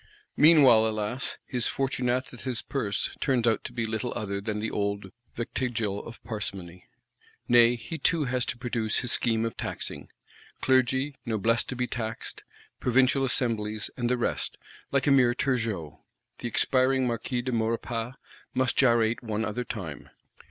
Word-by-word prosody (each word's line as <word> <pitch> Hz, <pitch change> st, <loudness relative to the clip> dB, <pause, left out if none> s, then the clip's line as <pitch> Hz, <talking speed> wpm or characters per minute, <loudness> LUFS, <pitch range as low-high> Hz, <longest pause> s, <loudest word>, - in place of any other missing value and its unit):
Meanwhile, 140 Hz, -8 st, +7 dB
alas, 110 Hz, +4 st, -2 dB
his 125 Hz, -3 st, 0 dB
Fotunatus' 130 Hz, -2 st, -1 dB
Purse 110 Hz, -8 st, -1 dB
turns 130 Hz, -4 st, +1 dB
out 115 Hz, -2 st, +2 dB
to -, -, -4 dB
be 120 Hz, -2 st, -2 dB
little 110 Hz, +2 st, -2 dB
other 100 Hz, -3 st, -3 dB
than 105 Hz, +1 st, -3 dB
the 110 Hz, +1 st, -2 dB
old 100 Hz, -1 st, -2 dB, 0.3 s
"vectigal 115 Hz, -4 st, -2 dB
of 115 Hz, -, -11 dB
Parsimony." 95 Hz, -5 st, -6 dB, 0.6 s
Nay, 120 Hz, 0 st, +6 dB
he 120 Hz, +8 st, -6 dB
too 160 Hz, +3 st, +2 dB
has 125 Hz, -2 st, 0 dB
to -, -, -2 dB
produce 115 Hz, -3 st, -1 dB
his 125 Hz, -2 st, 0 dB
scheme 115 Hz, -1 st, +1 dB
of 115 Hz, -, -3 dB
taxing: -, -, -5 dB, 0.5 s
Clergy, 130 Hz, +2 st, +2 dB
Noblesse 115 Hz, 0 st, +1 dB
to 125 Hz, -, -5 dB
be 125 Hz, 0 st, 0 dB
taxed; 115 Hz, -2 st, -4 dB, 0.4 s
Provincial 130 Hz, +2 st, +3 dB
Assemblies, 110 Hz, -5 st, -1 dB
and 120 Hz, -2 st, -1 dB
the 125 Hz, -, +2 dB
rest,—like 135 Hz, +2 st, -3 dB
a 145 Hz, -, +4 dB
mere 125 Hz, -3 st, +5 dB
Turgot! 115 Hz, -, -1 dB, 0.4 s
The -, -, -3 dB
expiring 130 Hz, +2 st, +2 dB
M. 115 Hz, -2 st, -1 dB
de 125 Hz, 0 st, -2 dB
Maurepas 115 Hz, +1 st, -1 dB, 0.4 s
must 130 Hz, -1 st, +1 dB
gyrate 115 Hz, -3 st, +3 dB
one 110 Hz, -2 st, -2 dB
other 120 Hz, +4 st, -2 dB
time. 95 Hz, -11 st, -6 dB
120 Hz, 145 wpm, -28 LUFS, 110-130 Hz, 0.6 s, Meanwhile